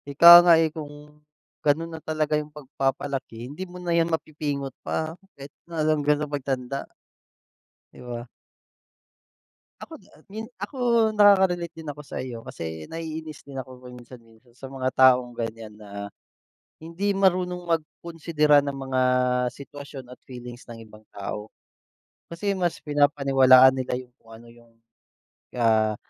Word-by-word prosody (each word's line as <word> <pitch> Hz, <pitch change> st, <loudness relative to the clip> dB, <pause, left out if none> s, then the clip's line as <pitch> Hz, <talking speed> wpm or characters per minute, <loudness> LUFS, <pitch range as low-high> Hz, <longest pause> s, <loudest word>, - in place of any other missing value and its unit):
Ika 170 Hz, +5 st, +10 dB
nga, 175 Hz, -1 st, +6 dB
eh, 160 Hz, -1 st, +1 dB
kung 150 Hz, -1 st, -11 dB, 0.4 s
ganun 165 Hz, +3 st, 0 dB
na 160 Hz, -, -8 dB
talaga 155 Hz, -1 st, -2 dB
yung 150 Hz, 0 st, -1 dB
pagpapalaki, 135 Hz, -4 st, -4 dB
hindi 155 Hz, +8 st, -8 dB
mo 180 Hz, -, -10 dB
na 175 Hz, -1 st, -2 dB
'yan 170 Hz, 0 st, +2 dB
mapipingot 150 Hz, -4 st, -3 dB
pa 160 Hz, 0 st, -3 dB, 0.2 s
kahit 140 Hz, +1 st, -11 dB, 0.2 s
na 160 Hz, -2 st, -2 dB
hanggang 150 Hz, -1 st, +2 dB
sa 150 Hz, -, -2 dB
pagtanda. 135 Hz, -2 st, -4 dB, 1.0 s
Di -, -, -15 dB
ba? 120 Hz, -1 st, -6 dB, 1.6 s
Ako, -, -, -10 dB
da -, -, -23 dB, 0.2 s
hin 220 Hz, +3 st, -6 dB, 0.2 s
ako, 205 Hz, +7 st, -6 dB, 0.4 s
nakaka-relate 190 Hz, -5 st, +4 dB
din 155 Hz, -, -7 dB
ako 145 Hz, 0 st, -7 dB
sa'yo. 120 Hz, -4 st, -7 dB
Kasi 80 Hz, -11 st, -7 dB
naiinis 160 Hz, -, -7 dB
din 140 Hz, -1 st, -11 dB
ako 130 Hz, -1 st, -8 dB
paminsan-minsan 120 Hz, -1 st, -15 dB
sa 130 Hz, +2 st, -10 dB
mga 130 Hz, -1 st, -2 dB
taong 125 Hz, -2 st, +4 dB
ganiyan 115 Hz, -2 st, -6 dB
na, 100 Hz, -1 st, -9 dB, 0.8 s
hindi 190 Hz, +5 st, -2 dB
marunong 180 Hz, -2 st, +1 dB
magkunsidera 160 Hz, -2 st, +1 dB
ng 140 Hz, -1 st, -4 dB
mga 130 Hz, -1 st, -1 dB, 0.5 s
sitwasyon 140 Hz, -1 st, -10 dB
at -, -, -18 dB
feelings 125 Hz, -1 st, -10 dB
ng 115 Hz, -1 st, -9 dB
ibang 110 Hz, 0 st, -16 dB
tao. 105 Hz, +1 st, -6 dB, 0.8 s
Kasi 200 Hz, +4 st, -2 dB
mas 175 Hz, -3 st, -1 dB
pinapaniwalaan 135 Hz, -3 st, +5 dB
nila 130 Hz, -1 st, -2 dB
yung 125 Hz, -1 st, -14 dB
kung 115 Hz, -, -22 dB
ano 115 Hz, +1 st, -13 dB
yung, 115 Hz, 0 st, -19 dB, 0.9 s
ah, 110 Hz, -2 st, +2 dB
140 Hz, 140 wpm, -25 LUFS, 125-160 Hz, 1.6 s, Ika